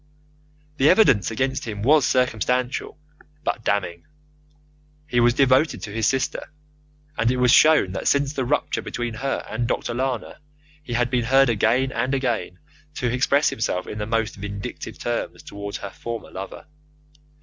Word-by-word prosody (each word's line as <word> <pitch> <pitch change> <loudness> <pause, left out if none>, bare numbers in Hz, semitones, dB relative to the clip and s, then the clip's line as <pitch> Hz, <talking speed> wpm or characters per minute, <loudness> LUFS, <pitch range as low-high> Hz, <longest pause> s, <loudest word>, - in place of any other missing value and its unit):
The 140 +3 +4
evidence 160 - +4
against 130 +4 -2
him 105 -3 -5
was 145 0 +4
circumstantial, 125 +1 0 0.5
but 115 - -2
damning. 90 -5 -1 1.0
He 125 -5 0
was 120 0 +4
devoted 135 +3 +3
to 105 - -6
his 110 +1 0
sister, 135 -1 -1 0.7
and 115 - +3
it 130 - +1
was 125 -1 +4
shown 155 -10 +5
that 95 - -4
since 140 0 +2
the 135 - -1
rupture 145 +4 -1
between 120 -1 -4
her 135 +5 -3
and 120 -1 -2
Dr. 120 - -2
Lana 130 -1 -3 0.4
he 125 -5 -7
had 120 +1 +1
been 125 -2 +1
heard 135 +1 +4
again 115 +4 +2
and 135 +1 -1
again 120 -8 -2 0.4
to 125 -2 -1
express 140 +3 +3
himself 90 -4 -2
in 105 - -7
the 105 - -3
most 115 -1 -1
vindictive 100 0 -6
terms - - -4
towards 100 0 -6
her 100 - -7
former 115 -1 -7
lover. 95 +1 -8
120 Hz, 160 wpm, -23 LUFS, 110-135 Hz, 1.0 s, shown